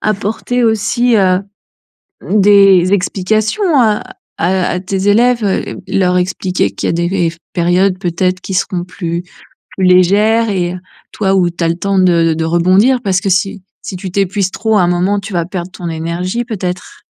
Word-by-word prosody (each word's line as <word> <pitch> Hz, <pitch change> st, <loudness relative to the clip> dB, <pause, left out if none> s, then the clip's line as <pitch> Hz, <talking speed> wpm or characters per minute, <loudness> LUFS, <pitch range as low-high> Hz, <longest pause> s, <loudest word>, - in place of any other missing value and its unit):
apporter 215 Hz, +4 st, -1 dB
aussi, 230 Hz, +2 st, +1 dB
heu, 185 Hz, -2 st, +2 dB, 0.9 s
des 195 Hz, -2 st, +5 dB
explications 215 Hz, -, 0 dB
à 215 Hz, -3 st, +2 dB, 0.3 s
à 185 Hz, +1 st, 0 dB
à 180 Hz, -, -2 dB
tes 190 Hz, +1 st, -3 dB
élèves, 235 Hz, +2 st, +3 dB
heu, 195 Hz, -, -2 dB
leur 180 Hz, -1 st, +1 dB
expliquer 180 Hz, -, -1 dB
qu'il -, -, -4 dB
y -, -, 0 dB
a -, -, 0 dB
des 170 Hz, +1 st, -1 dB
rev 175 Hz, -3 st, -1 dB, 0.2 s
périodes 180 Hz, +2 st, +1 dB
peut-être 185 Hz, +1 st, -1 dB
qui 190 Hz, -, -6 dB
seront 185 Hz, -1 st, -1 dB
plus 175 Hz, -1 st, -5 dB, 0.5 s
plus 190 Hz, -, +1 dB
légères 205 Hz, +5 st, +3 dB
et 180 Hz, -2 st, -1 dB, 0.4 s
toi, 195 Hz, -2 st, 0 dB
où 180 Hz, -2 st, +2 dB
tu 170 Hz, 0 st, -5 dB
as -, -, +2 dB
le 165 Hz, -, 0 dB
temps 195 Hz, 0 st, 0 dB
de 170 Hz, -3 st, +3 dB
de 160 Hz, 0 st, -2 dB
rebondir. 185 Hz, +10 st, +3 dB
Parce 195 Hz, -1 st, 0 dB
que 195 Hz, -, -2 dB
si 195 Hz, +1 st, 0 dB, 0.2 s
si 185 Hz, -, -7 dB
tu 185 Hz, 0 st, -6 dB
t'épuises 195 Hz, 0 st, -1 dB
trop 220 Hz, -1 st, 0 dB
à -, -, +4 dB
un -, -, +2 dB
moment, 185 Hz, +3 st, 0 dB
tu 205 Hz, -1 st, -8 dB
vas 170 Hz, -1 st, 0 dB
perdre 180 Hz, -1 st, -6 dB
ton 175 Hz, -1 st, -6 dB
énergie 170 Hz, +8 st, -3 dB
peut-être? 185 Hz, -6 st, -6 dB
190 Hz, 180 wpm, -14 LUFS, 180-205 Hz, 0.9 s, des